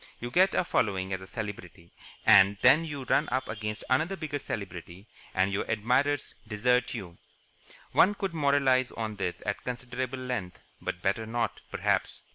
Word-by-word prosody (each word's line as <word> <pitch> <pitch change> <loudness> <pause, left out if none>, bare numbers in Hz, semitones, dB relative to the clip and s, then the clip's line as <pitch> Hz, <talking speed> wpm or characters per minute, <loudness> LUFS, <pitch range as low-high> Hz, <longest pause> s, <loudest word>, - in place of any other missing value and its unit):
You 120 0 -5
get 190 +5 +4
a - - +3
following 95 - 0
as 95 - -3
a 95 - -10
celebrity, 95 -6 -7 0.3
and 100 +1 +7
then 135 +6 +7
you 145 -4 -5
run - - +2
up 130 +2 -1
against 105 0 -4
another 155 +9 +1
bigger 155 -4 -4
celebrity 95 -5 -7 0.3
and 95 +1 +2
your 100 - -1
admirers 125 +6 +1
desert 125 +3 +1
you. 85 -3 -8 0.7
One 205 +2 +5
could 195 -3 -3
moralize 140 -4 +3
on 110 -2 -4
this 90 -2 -3
at 100 -1 -3
considerable 125 +1 -4
length, 125 -9 -4 0.2
but 90 - -4
better 105 +3 0
not, 115 +1 -2
perhaps. - - -1
120 Hz, 160 wpm, -29 LUFS, 100-135 Hz, 0.7 s, and